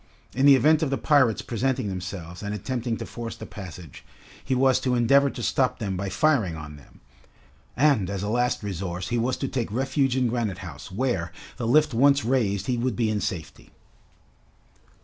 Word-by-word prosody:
In 130 Hz, +4 st, +3 dB
the 140 Hz, -, +9 dB
event 155 Hz, +4 st, +4 dB
of 155 Hz, -, +1 dB
the 135 Hz, -, 0 dB
pirates 130 Hz, -7 st, +3 dB
presenting 130 Hz, 0 st, -1 dB
themselves 90 Hz, -2 st, -6 dB
and 105 Hz, 0 st, -4 dB
attempting 120 Hz, +2 st, -3 dB
to -, -, -6 dB
force 115 Hz, -1 st, -7 dB
the -, -, -9 dB
passage, 90 Hz, -, -10 dB, 0.4 s
he 130 Hz, -, 0 dB
was 130 Hz, 0 st, +3 dB
to 125 Hz, -1 st, 0 dB
endeavor 140 Hz, +4 st, +4 dB
to 120 Hz, -, -7 dB
stop 130 Hz, +2 st, +1 dB
them 100 Hz, -4 st, -3 dB
by 95 Hz, +2 st, -3 dB
firing 110 Hz, -, +1 dB
on 75 Hz, -1 st, -8 dB
them, 70 Hz, -, -18 dB, 0.8 s
and 135 Hz, -10 st, +3 dB
as 100 Hz, -1 st, -3 dB
a -, -, -2 dB
last 120 Hz, +1 st, 0 dB
resource 90 Hz, -2 st, -4 dB
he 120 Hz, -, 0 dB
was 125 Hz, +3 st, 0 dB
to 135 Hz, -, -2 dB
take 120 Hz, -5 st, -3 dB
refuge 135 Hz, +2 st, 0 dB
in 125 Hz, -1 st, +2 dB
Granite 115 Hz, -6 st, -2 dB
House, 85 Hz, +1 st, -9 dB
where, 95 Hz, -6 st, -1 dB, 0.3 s
the 120 Hz, -, -3 dB
lift 150 Hz, +3 st, +4 dB
once 140 Hz, +3 st, +4 dB
raised, 105 Hz, -6 st, +1 dB
he 125 Hz, +1 st, -1 dB
would 125 Hz, -2 st, -1 dB
be 110 Hz, +1 st, +1 dB
in 105 Hz, -1 st, -1 dB
safety. 80 Hz, -5 st, -5 dB
120 Hz, 190 wpm, -25 LUFS, 100-130 Hz, 0.8 s, the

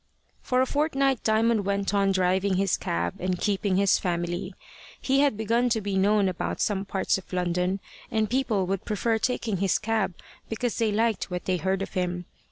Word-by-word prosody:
For 255 Hz, 0 st, +1 dB
a -, -, +3 dB
fortnight 275 Hz, -3 st, +1 dB
Diamond 220 Hz, 0 st, +2 dB
went 200 Hz, 0 st, -1 dB
on 200 Hz, -1 st, +3 dB
driving 190 Hz, +1 st, +2 dB
his 195 Hz, 0 st, +2 dB
cab, 85 Hz, +1 st, -2 dB
and 185 Hz, -1 st, -1 dB
keeping 200 Hz, -2 st, 0 dB
his 200 Hz, 0 st, +3 dB
family. 175 Hz, +1 st, -2 dB, 0.4 s
He 270 Hz, 0 st, +1 dB
had 280 Hz, -6 st, +3 dB
begun 230 Hz, +3 st, +1 dB
to 225 Hz, -1 st, +1 dB
be 200 Hz, -2 st, -3 dB
known 200 Hz, +1 st, +3 dB
about 185 Hz, -2 st, -3 dB
some 200 Hz, -2 st, 0 dB
parts 195 Hz, 0 st, 0 dB
of -, -, -17 dB
London, 180 Hz, +1 st, 0 dB, 0.3 s
and 220 Hz, -1 st, +1 dB
people 235 Hz, -5 st, 0 dB
would 195 Hz, 0 st, -2 dB
prefer 220 Hz, +2 st, 0 dB
taking 225 Hz, -4 st, -1 dB
his 195 Hz, 0 st, +2 dB
cab 215 Hz, -4 st, -1 dB, 0.3 s
because 230 Hz, +1 st, -2 dB
they 225 Hz, -2 st, +2 dB
liked 220 Hz, -2 st, 0 dB
what 180 Hz, -1 st, -4 dB
they 185 Hz, -1 st, +1 dB
heard 190 Hz, +2 st, -1 dB
of -, -, -8 dB
him. 180 Hz, -2 st, -2 dB
200 Hz, 185 wpm, -26 LUFS, 185-225 Hz, 0.4 s, a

